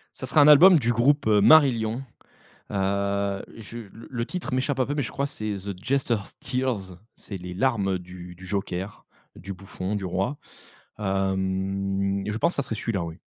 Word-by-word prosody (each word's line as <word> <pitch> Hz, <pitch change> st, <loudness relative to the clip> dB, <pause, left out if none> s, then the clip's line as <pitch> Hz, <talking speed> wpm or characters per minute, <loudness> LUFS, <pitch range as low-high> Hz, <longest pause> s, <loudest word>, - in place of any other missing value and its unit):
Ça -, -, -6 dB
sera 145 Hz, +3 st, +4 dB
un 145 Hz, -, +7 dB
album 165 Hz, +3 st, +9 dB
du 120 Hz, -1 st, +1 dB
groupe, 140 Hz, +4 st, +2 dB
heu, 105 Hz, -2 st, +4 dB
Marillion. 120 Hz, -4 st, +5 dB, 0.7 s
Heu, 100 Hz, 0 st, 0 dB
je 115 Hz, +1 st, -9 dB, 0.2 s
le 115 Hz, -, -12 dB
le 115 Hz, -3 st, -3 dB
titre 170 Hz, -2 st, -5 dB
m'échappe 130 Hz, +1 st, 0 dB
un 130 Hz, -, +3 dB
peu, 145 Hz, -, -3 dB
mais 145 Hz, -, 0 dB
je -, -, -5 dB
crois 140 Hz, -, -1 dB
que 140 Hz, -, -4 dB
c'est 110 Hz, -1 st, -3 dB
The 100 Hz, 0 st, -6 dB
Jester's 125 Hz, -6 st, -1 dB
Tears, 125 Hz, -9 st, -2 dB, 0.2 s
c'est 100 Hz, -, -8 dB
les 90 Hz, 0 st, -7 dB
larmes 100 Hz, -4 st, +1 dB
du 90 Hz, 0 st, -11 dB
du 95 Hz, +1 st, -12 dB
joker, 95 Hz, 0 st, -4 dB, 0.3 s
du 95 Hz, +4 st, -7 dB
bouffon 95 Hz, +1 st, -5 dB
du 100 Hz, -2 st, -3 dB
roi, 95 Hz, +10 st, -1 dB, 0.6 s
hem 95 Hz, 0 st, -1 dB
et -, -, -1 dB
je 105 Hz, -, -2 dB
pense, 170 Hz, -, +2 dB
ça -, -, 0 dB
serait 115 Hz, -, -4 dB
celui-là, 105 Hz, -4 st, -2 dB
oui. 80 Hz, -1 st, -8 dB
100 Hz, 190 wpm, -25 LUFS, 95-130 Hz, 0.7 s, album